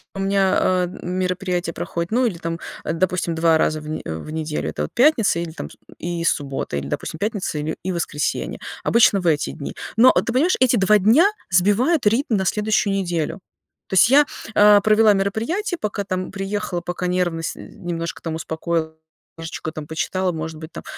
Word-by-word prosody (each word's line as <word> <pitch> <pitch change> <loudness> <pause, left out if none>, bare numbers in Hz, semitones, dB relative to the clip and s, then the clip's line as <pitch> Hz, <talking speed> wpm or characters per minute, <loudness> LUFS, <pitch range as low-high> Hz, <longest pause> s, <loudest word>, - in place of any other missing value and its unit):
У - - -5
меня, 195 0 +2
а, 185 -1 +2
мероприятие 180 -1 -2
проходит, 170 0 -3
ну 250 +3 +2
или 190 -8 -2
там, 165 0 -4 0.2
а, - - -2
допустим, 175 -1 0
2 165 0 +3
раза 155 0 +1
в 150 - -10
не 155 - -4
в 80 - -6
неделю. 155 - -3
Это 75 - -5
вот - - -5
пятница 245 - +4
или 170 -1 -4
там 75 - -7
с - - -15 0.2
и 170 0 -3
с 170 - +4
субботы, 135 - -3
или, 70 - -6
допустим, 160 - -4
пятница 200 -6 -2
или 155 +2 -3
и 185 - -2
воскресенье. 165 -4 -2 0.2
Обычно 225 -4 +4
в 175 - -2
эти 150 -3 +1
дни, 140 - -7 0.2
но, 240 +4 +7
а, - - +3
ты 230 - -3
понимаешь, 315 +9 +3
эти 255 -1 +4
2 210 0 +4
дня 230 - +5 0.2
сбивают 205 - +3
ритм 230 +2 +2
на 190 - -1
следующую 210 0 +1
неделю. 175 -2 -2 0.5
То - - -7
есть 190 +5 +6
я, 290 +3 +6 0.3
а, 205 0 +7
провела 215 0 +5
мероприятие, 230 - -1
пока 205 -1 -2
там 185 -2 -3
приехала, 195 -2 -3
пока 175 +1 -4
нервность 175 -2 -1
немножко 170 -1 -6
там 165 - -3
успокоил, 160 0 -3 0.4
книжечку 160 -1 -6
там 155 -1 -8
почитала, 185 +3 -1
может 160 0 -5
быть, 160 +1 -9
там, - - -8
180 Hz, 190 wpm, -21 LUFS, 165-210 Hz, 0.5 s, но